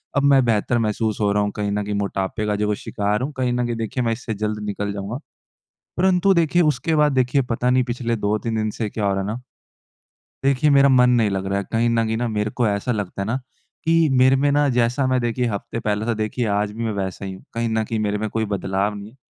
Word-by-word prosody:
अब 140 - +2
मैं 140 -2 +5
बेहतर 115 +1 +1
महसूस 110 -1 -1
हो 100 -1 +2
रहा 105 0 +2
हूँ, 105 - -1
कहीं 105 -1 -2
न 105 0 -1
कहीं 105 - -3
मोटापे 100 +1 -2
का 105 - +1
जो 105 +1 0
वो 105 - +1
शिकार 105 +1 -2
हूँ, 135 +4 -2
कहीं 125 -1 0
न 125 0 0
कहीं 120 -1 -2
देखिए, 115 +3 -2
मैं 115 - +1
इससे 115 0 -5
जल्द 105 +1 -3
निकल 100 0 -3
जाऊँगा। 100 +5 -5 0.8
परंतु 190 +1 +3
देखिए, 170 0 +3
उसके 155 +1 +1
बाद 150 -1 +3
देखिए, 130 +1 +2
पता 125 +1 -1
नहीं 130 0 +3
पिछले 120 -1 -2
2-3 110 +2 -1
दिन 110 0 0
से 110 +1 -3
क्या 105 - -3
हो 100 - +2
रहा 95 - -1
है 95 - -3
ना। 105 +2 -3 1.1
देखिए, 140 +2 +3
मेरा 140 -1 +6
मन 125 -2 +5
नहीं 115 -4 +3
लग 95 0 -2
रहा 100 +1 0
है। 100 - -3
कहीं 115 +1 +2
न 115 -1 +2
कहीं 110 0 -1
ना, 120 +1 -1
मेरे 105 -1 -1
को 120 +1 0
ऐसा 100 +5 -1
लगता 100 -2 -3
है - - -3
ना 115 +4 0 0.5
कि 165 -1 +3
मेरे 130 +1 +5
में 145 +2 +2
ना, 145 0 +3
जैसा 125 +1 +1
मैं 130 -1 +1
देखिए, 120 +1 -1
हफ़्ते 110 +2 -4
पहले 105 0 -1
था 120 - +1
देखिए, 110 +3 -2
आज 105 0 0
भी 115 +2 -4
मैं 110 - -1
वैसा 95 -1 -4
ही 95 - -5
हूँ। 95 - -12
कहीं 115 0 -1
न 110 0 0
कहीं 110 +1 -3
मेरे 105 -1 -1
में 110 +1 -2
कोई 110 +1 -1
बदलाव 95 +2 -1
नहीं। 105 +3 -9
115 Hz, 260 wpm, -22 LUFS, 105-125 Hz, 1.1 s, मेरा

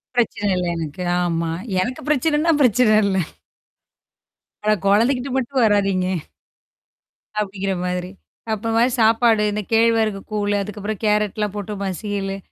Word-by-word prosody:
பிரச்சன 215 -4 0
இல்ல 180 - -1
எனக்கு. 160 +2 -5 0.2
ஆமா. 165 -1 -1 0.3
எனக்கு 250 +7 -3
பிரச்சனைன்னா 305 +3 +2
பிரச்சன 235 -3 +4
இல்ல. 195 -1 +1 1.5
ஆனா 215 0 +3
குழந்தைக்கிட்ட 245 +6 +2
மட்டும் 265 0 0
வராதீங்க. 195 -3 +2 1.3
அப்படிங்கிற 195 -1 -2
மாதிரி. 180 0 -3 0.4
அப்புறம் 230 +3 +1
சாப்பாடு, 225 -1 +4
இந்த 210 +1 -2
கேழ்வரகு 225 -2 +3
கூழு, 205 -1 0
அதுக்கப்புறம் 210 +1 -5
கேரட்லாம் 210 -1 0
போட்டு 205 0 -4
மசீயலு 195 0 -3
210 Hz, 110 wpm, -21 LUFS, 195-230 Hz, 1.5 s, பிரச்சன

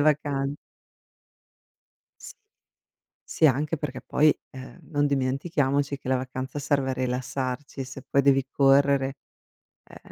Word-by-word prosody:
vacan 145 -2 +1 1.7
S - - -9 0.9
Sì, 160 - +2
anche 150 +4 +1
perché 145 -3 -5
poi, 150 +1 +3 0.2
uhm, 130 +4 -10
non 145 -2 +2
dimentichiamoci 140 +1 0
che 130 - -9
la 130 - +3
vacanza 130 +2 -5
serve 140 -2 0
a - - 0
rilassarci, 130 +2 -3
se 135 +1 -9
poi 140 - +3
devi 135 -1 +4
correre 135 -1 +3 0.7
ehm, - - -15
140 Hz, 120 wpm, -26 LUFS, 130-145 Hz, 1.7 s, devi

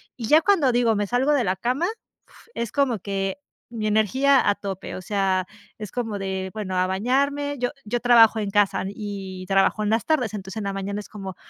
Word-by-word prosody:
Y 235 - -5
ya 305 +5 +6
cuando 320 -8 +3
digo: 235 -2 +2
"Me 205 0 0
salgo 250 +7 +1
de 280 -4 +2
la 185 -2 0
cama", 250 - -1 0.4
f 465 - -21
es 235 -1 -3
como 275 -5 +1
que 195 +2 -3 0.3
mi 225 -2 -4
energía 260 +6 +3
a 205 - +2
tope. 195 -2 -6
O 185 - -6
sea, 190 -1 0 0.3
es 210 -3 -7
como 225 -5 -3
de 190 -1 -3
bueno 200 -4 -4
a 185 0 +2
bañarme 280 +8 0
yo 245 0 -1
yo 240 +3 -1
trabajo 230 -2 +6
en 205 -2 -2
casa, 205 -2 +2
y 195 -2 -6
trabajo 195 +2 +2
en 210 - 0
las 225 0 +1
tardes, 255 -10 0
entonces 190 -2 -7
en - - -4
la 200 - -1
mañana 195 +1 -4
es - - -14
como 195 -3 -7
210 Hz, 215 wpm, -24 LUFS, 195-245 Hz, 0.4 s, ya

